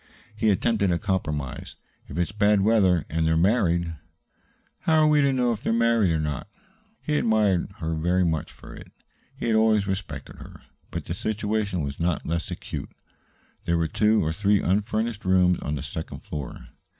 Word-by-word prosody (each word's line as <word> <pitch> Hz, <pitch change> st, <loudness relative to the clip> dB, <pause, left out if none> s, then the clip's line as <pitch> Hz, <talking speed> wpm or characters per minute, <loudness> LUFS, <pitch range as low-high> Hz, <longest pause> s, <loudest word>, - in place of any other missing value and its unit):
He 110 Hz, 0 st, +1 dB
attempted 105 Hz, 0 st, +2 dB
a 85 Hz, -, +2 dB
compromise. 75 Hz, -8 st, -3 dB, 0.3 s
"If 70 Hz, -, -7 dB
it's 90 Hz, +2 st, 0 dB
bad 105 Hz, -1 st, +3 dB
weather, 95 Hz, -6 st, +3 dB
and 80 Hz, 0 st, 0 dB
they're 80 Hz, 0 st, +2 dB
married 85 Hz, -3 st, +2 dB, 0.4 s
" -, -, -40 dB
"How 160 Hz, -1 st, +5 dB
are -, -, +5 dB
we 150 Hz, -1 st, +4 dB
to 140 Hz, -1 st, +3 dB
know 125 Hz, -2 st, +1 dB
if 110 Hz, -, -7 dB
they -, -, -2 dB
are -, -, +2 dB
married 115 Hz, -4 st, +3 dB
or 80 Hz, -1 st, +1 dB
not?" 75 Hz, +3 st, -3 dB, 0.6 s
He 150 Hz, -1 st, +1 dB
admired 105 Hz, -6 st, +2 dB
her 80 Hz, 0 st, -3 dB
very 90 Hz, +3 st, +1 dB
much 80 Hz, -2 st, -1 dB
for -, -, -13 dB
it. -, -, -12 dB, 0.5 s
He -, -, -4 dB
had 115 Hz, -1 st, +2 dB
always 110 Hz, -2 st, +3 dB
respected 95 Hz, -8 st, -5 dB
her. -, -, -12 dB, 0.3 s
But -, -, -5 dB
the 85 Hz, -, -3 dB
situation 105 Hz, -3 st, -2 dB
was 70 Hz, -1 st, -5 dB
not 85 Hz, -1 st, -1 dB
less 85 Hz, +1 st, -2 dB
acute. -, -, -6 dB, 0.8 s
There 85 Hz, 0 st, +1 dB
were 85 Hz, -1 st, +1 dB
two 105 Hz, +3 st, +2 dB
or 80 Hz, -, -1 dB
three 100 Hz, +3 st, +2 dB
unfurnished 105 Hz, +3 st, -1 dB
rooms 90 Hz, -1 st, +3 dB
on 75 Hz, -, -3 dB
the 70 Hz, -, -5 dB
second 80 Hz, -, -6 dB
floor. 70 Hz, -4 st, -7 dB
95 Hz, 185 wpm, -25 LUFS, 80-110 Hz, 0.8 s, How